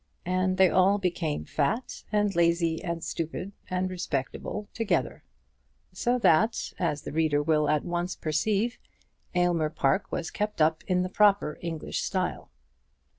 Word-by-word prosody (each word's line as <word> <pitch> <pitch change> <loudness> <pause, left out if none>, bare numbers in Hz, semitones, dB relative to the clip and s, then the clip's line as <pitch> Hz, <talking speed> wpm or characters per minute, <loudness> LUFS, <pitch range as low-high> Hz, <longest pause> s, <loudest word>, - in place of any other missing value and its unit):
And 185 +1 +1
they 190 0 +7
all 190 +3 +4
became 175 -5 -2
fat, 155 - -1
and 210 -2 +1
lazy, 170 -1 +2
and 170 -2 -3
stupid, 165 +4 -4 0.2
and 185 0 0
respectable 180 +3 -4
together; 190 - -1 0.7
so 240 +6 +1
that, 220 0 +2
as 150 -5 -1
the - - -6
reader 155 -2 +2
will 150 -1 +2
at 150 -1 +1
once 175 +1 -2
perceive, 205 +9 0 0.6
Aylmer 175 -3 +2
Park 145 +4 0
was 170 - -3
kept 210 -2 -3
up 155 0 +2
in 180 -1 +2
the 185 - -3
proper 200 -6 +3
English 165 -3 -3
style. - - -2
175 Hz, 140 wpm, -28 LUFS, 160-195 Hz, 0.7 s, they